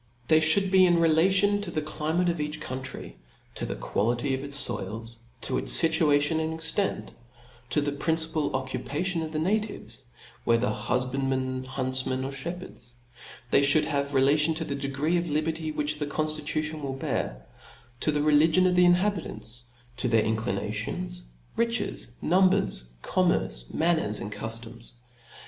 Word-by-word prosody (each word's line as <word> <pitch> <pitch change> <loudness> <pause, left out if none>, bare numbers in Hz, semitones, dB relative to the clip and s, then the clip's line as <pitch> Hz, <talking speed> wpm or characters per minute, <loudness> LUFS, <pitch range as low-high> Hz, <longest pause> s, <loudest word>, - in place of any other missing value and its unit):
They 155 - +6
Ihould 170 +5 +3
be 185 -1 +6
relative 185 +5 +3
to 205 - -5
the 160 - -1
climate 155 +3 -1
of 170 -3 0
each 150 0 -4
country, 130 0 -7 0.4
to - - -4
the - - -3
quality 120 +6 -1
of 130 +1 -3
its 140 0 -1
foil, 110 +4 -4 0.4
to 130 - -1
its - - +8
fituatioa 155 -1 +3
and 160 0 -3
extent, 160 +5 -2 0.6
to 150 - +1
the 145 0 -1
principal 160 +1 -1
occuparion 140 +7 -2
of 155 - -5
the 155 - -3
na 190 +8 +2
tives, 215 0 -8 0.4
whether 115 +1 +2
hufbandmen, 130 0 -1
huntfiiaen, 130 0 -1
or 135 - -4
fhep 160 +6 -3
hcrds: 120 -9 -13 0.6
they 140 - +5
(hould 145 +2 +4
have 140 -1 -1
a - - -4
relation 150 +4 +3
to 160 - -2
the 140 - -3
degree 140 +4 -1
of 170 -1 -2
liberty 155 +1 -1
which 150 0 -2
the 150 - -2
conftitution 155 0 -2
will 135 -2 -3
bear; - - -3 0.5
to 155 - +1
the 150 0 0
religion 155 +4 +4
of 180 -1 +3
the 180 0 +6
inhabitants, 175 - 0 0.4
to' 125 - 0
their 115 -2 +3
inclinations, 105 - -3 0.3
riches, 230 +1 -1 0.2
numbers, 190 - +2 0.2
commerce, 115 - 0
nianner^, 160 -10 0
and 105 - -6
cuftoms. 115 +2 -8
150 Hz, 155 wpm, -27 LUFS, 130-165 Hz, 0.6 s, its